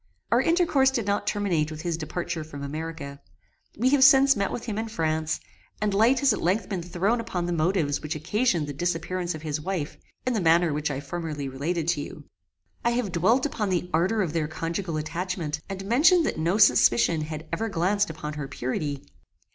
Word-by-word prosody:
Our - - +5
intercourse 330 -6 +3
did 240 -5 -2
not 200 0 -1
terminate 180 -7 0
with 155 +1 -7
his 170 -2 -1
departure 165 +1 -4
from 145 -2 -8
America. 145 -1 -6 0.6
We 245 +5 +3
have 275 -1 +4
since 275 0 +7
met 200 -2 -1
with 235 - -5
him 220 -3 -3
in 225 - -3
France, 160 -5 -1 0.4
and 210 -1 0
light 230 +7 +4
has 275 -5 +4
at - - -4
length 185 +4 +1
been 190 -4 -2
thrown 185 +7 0
upon 185 -6 -3
the 175 - -1
motives 160 -3 +1
which 155 +1 -4
occasioned 175 - 0
the 145 - -5
disappearance 175 +2 -2
of 155 - -9
his 150 -1 -3
wife, 175 -3 -3 0.3
in 255 - +1
the 220 - 0
manner 165 -1 +4
which 150 +1 -1
I 135 -1 -3
formerly 150 -1 -4
related 155 +5 -2
to 165 -4 +1
you. - - -8 0.6
I 235 - +3
have 235 -5 -1
dwelt 220 - +2
upon 220 -8 -2
the 180 -1 -1
ardour 190 +7 +2
of 165 -4 -3
their 160 -2 0
conjugal 165 +2 -3
attachment, 165 -1 -3
and 195 0 -5
mentioned 320 - +5
that - - -2
no 170 +5 +1
suspicion 125 - +4
had 155 +1 -5
ever 225 +1 -1
glanced 200 +3 +1
upon 155 -1 -6
her 150 -2 -5
purity. 140 +1 -3
175 Hz, 200 wpm, -26 LUFS, 155-210 Hz, 0.6 s, since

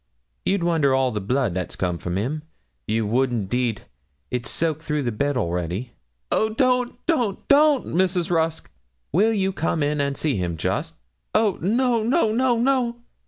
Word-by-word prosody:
You'd 195 -2 +1
wonder 160 -6 +3
all 130 -1 +2
the 105 - -3
blood 125 0 0
that's 90 0 -3
come 90 -2 -2
from 90 +1 -3
him 135 +10 -2 0.5
you 110 +1 0
would 125 +5 +2
indeed; 115 0 -1 0.5
it's 125 -1 -2
soaked 160 -2 -1
through 150 -2 -1
the 120 - -1
bed 140 +5 -1
already.' 90 +3 -2 0.4
'Oh, 220 - +2
don't, 250 +1 +1
don't, 245 - 0
don't, 290 -1 +5
Mrs. 180 -1 0
Rusk.' 160 - 0 0.4
'Will 205 +8 +3
you 195 -3 0
come 165 -3 0
in 145 0 0
and 140 -1 -1
see 145 -8 0
him, 85 -3 -2
just? 145 - -2 0.4
'Oh, 215 -4 +2
no, 235 +5 +2
no, 235 +1 +2
no, 245 +1 +2
no!' 245 -1 +1
155 Hz, 165 wpm, -23 LUFS, -, 0.5 s, don't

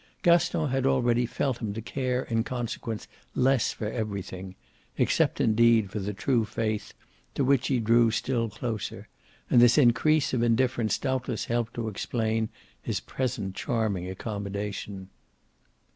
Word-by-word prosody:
Gaston 170 -2 +3
had 135 0 +1
already 120 -2 +2
felt 125 0 -1
him 110 -4 -3
to - - -3
care 130 0 -1
in 115 -1 0
consequence 120 -2 -4 0.3
less 130 -2 +3
for - - -6
everything 100 -4 -4 0.4
except - - +2
indeed 115 -2 +4
for 105 - -3
the 100 +1 -3
true 115 +3 +1
faith, 110 0 -3 0.4
to 140 - +1
which 135 -1 +3
he 130 -3 +1
drew 115 +1 +4
still 115 +1 -1
closer 110 -1 -5 0.4
and 120 - +5
this 120 0 +6
increase 145 +3 +4
of 125 - +1
indifference 120 -1 +2
doubtless 130 -1 -2
helped 120 -1 -1
to 115 -1 -3
explain 110 +1 -1 0.3
his - - -2
present 120 -7 -3
charming 100 -5 -1
accommodation. 100 -1 -5
115 Hz, 140 wpm, -27 LUFS, 105-125 Hz, 0.4 s, this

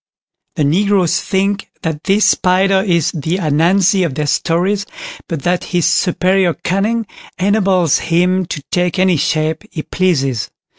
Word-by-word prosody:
The 150 - 0
Negroes 185 +3 +1
think 195 +1 -1
that 160 -2 -4
this 205 +2 +3
spider 190 +1 +2
is 170 -6 +1
the 160 +2 -2
"Ananzi" 180 +4 +2
of 155 -7 -2
their 150 - -2
stories, 185 +7 0 0.4
but 160 -5 -5
that 175 0 0
his 175 -3 0
superior 180 0 +1
cunning 215 +5 -1 0.3
enables 190 -4 +2
him 180 +2 +1
to 145 - -6
take 180 0 0
any 185 -2 +3
shape 155 +2 -1
he 155 - -6
pleases. 135 -10 -1
180 Hz, 140 wpm, -16 LUFS, 160-195 Hz, 0.4 s, this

